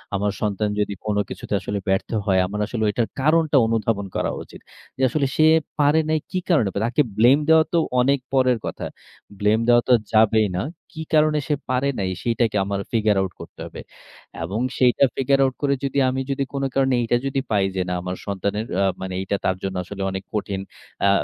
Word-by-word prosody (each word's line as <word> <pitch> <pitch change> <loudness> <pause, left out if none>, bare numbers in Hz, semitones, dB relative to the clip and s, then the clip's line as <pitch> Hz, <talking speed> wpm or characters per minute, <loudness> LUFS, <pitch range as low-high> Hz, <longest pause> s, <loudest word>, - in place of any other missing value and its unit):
আমার 100 +1 0
সন্তান 105 0 0
যদি 105 0 0
কোন 105 -1 0
কিছুতে - - -6
আসলে 100 - -3
ব্যর্থ 95 0 0 0.2
হয়, 95 -3 +3
আমার 105 +2 -5
আসলে 110 +1 -3
ওইটার 110 +2 0
কারণটা 155 0 +3
অনুধাবন 110 -3 0
করা - - 0
উচিত। - - -14 0.4
যে - - -5
আসলে 145 +2 0
সে 155 - +4 0.3
পারে 145 +2 +4
নাই 155 0 +2
কি 185 - 0
কারণে? 150 - +3
বা - - 0
তাকে 120 +5 +2 0.2
blame 125 +7 +5
দেওয়া 160 0 +7
তো - - +3 0.2
অনেক 140 +2 +2
পরের 130 -2 +3
কথা। - - -5 0.5
Blame 105 +2 +2
দেওয়া 120 0 +6
তো - - +7 0.2
যাবেই 110 -1 +4
না। 95 - -1 0.3
কি 160 - -3
কারণে 155 0 +4
সে 150 - +1
পারে 130 +2 +1
নাই, 95 -1 -1
সেটাকে 115 -2 +1
আমার 100 0 -2
figure 110 -3 +2
out 95 -1 -2
করতে - - -12
হবে। - - -9 0.6
এবং 95 +6 -3 0.2
সেইটা 125 +1 +3
figure 135 +1 +2
out 130 - 0
করে 140 -1 +2
যদি 135 0 -2
আমি 130 +1 -2
যদি 135 0 0
কোন 140 0 -2
কারণে 135 -1 +2
এইটা 120 +1 +2
যদি 135 0 0
পাই 100 -2 +3
যে, 95 - 0
না, - - -1
আমার 90 +1 -4
সন্তানের 100 +2 -2 0.2
আ - - +3 0.2
মানে 95 0 -4
এইটা 100 +1 -1
তার 95 - +2
জন্য 95 -1 -3
আসলে 100 +2 -8
অনেক 95 0 -5
কঠিন। 100 -2 -2 0.5
আ - - +5
115 Hz, 205 wpm, -22 LUFS, 100-135 Hz, 0.6 s, দেওয়া